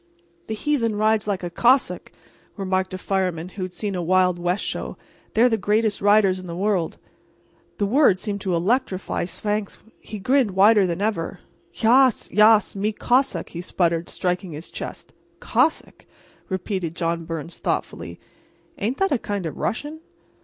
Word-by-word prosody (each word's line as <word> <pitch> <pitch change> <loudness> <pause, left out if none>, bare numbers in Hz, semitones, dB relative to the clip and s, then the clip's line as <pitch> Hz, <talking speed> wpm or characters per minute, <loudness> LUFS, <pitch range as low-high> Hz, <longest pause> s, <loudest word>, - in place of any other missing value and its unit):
"The 220 - -3
heathen 230 -4 0
rides 215 0 +2
like 195 -3 -2
a 175 - -4
Cossack," 250 +8 +2 0.5
remarked 190 -1 -1
a 185 - -4
fireman 185 -3 -2
who 190 - -9
had 185 0 -3
seen 205 +2 -4
a 180 - -2
Wild 180 0 +2
West 175 +3 -1
show—"they're 230 +3 -2
the 225 -2 +1
greatest 210 +1 +1
riders 200 -2 +4
in 185 - -9
the 170 - -5
world." 190 -3 0 0.8
The 205 - +1
word 220 -3 +4
seemed 200 -1 -4
to 185 -3 0
electrify 190 0 0
Svangvsk. 205 +2 -3 0.2
He 215 - -8
grinned 240 -1 +1
wider 205 0 +6
than 175 +2 -3
ever. 210 -6 -2 0.3
"Yas—yas—me 220 -4 +4
Cossack," 255 +5 +1
he 170 - -6
spluttered, 170 -2 0
striking 180 -1 -2
his 155 +3 -9
chest. - - -8 0.3
"Cossack!" 320 - 0 0.4
repeated 185 -3 -3
John 165 -1 -1
Byrnes, 165 0 -6
thoughtfully, - - -3 0.6
"ain't 225 +6 -1
that 390 -1 +1
a 275 - +2
kind 205 -4 -3
of 155 - -4
a - - -12
Russian?" 295 +7 -3
200 Hz, 155 wpm, -23 LUFS, 180-220 Hz, 0.8 s, wider